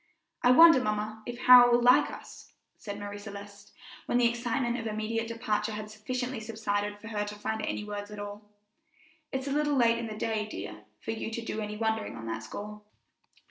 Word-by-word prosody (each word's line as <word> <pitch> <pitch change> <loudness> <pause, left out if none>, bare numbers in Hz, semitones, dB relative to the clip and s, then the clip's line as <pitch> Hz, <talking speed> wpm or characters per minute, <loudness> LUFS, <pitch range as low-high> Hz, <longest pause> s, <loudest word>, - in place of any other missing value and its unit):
"I 245 - +4
wonder, 325 +1 +8
mamma, 215 -1 -2
if 240 0 -5
Harold 245 -1 +9
will 240 - +4
like 250 +1 +6
us?" - - -11 0.3
said 205 -2 -6
Marie 205 0 -6
Celeste, 205 0 -10 0.4
when 245 - +2
the 245 - +4
excitement 240 +1 -1
of 225 - -4
immediate 220 +1 -2
departure 220 -2 -2
had 210 0 -6
sufficiently 250 +3 -4
subsided 205 -2 -2
for 225 +2 -10
her 210 -2 -1
to 210 0 -6
find 220 +1 -3
any 210 - -2
words 205 0 -6
at 210 - -9
all. 205 0 -7 0.9
"It's 265 0 -3
a 280 - -3
little 295 0 +1
late 235 -2 +3
in 235 - -4
the 215 -1 -7
day, 215 -1 -1
dear, - - -8 0.2
for - - -4
you 225 0 -4
to 230 0 -5
do 220 - -3
any 210 0 -5
wondering 220 0 -1
on 115 - -8
that 110 0 -4
score." 210 - -8
220 Hz, 200 wpm, -29 LUFS, 210-240 Hz, 0.9 s, Harold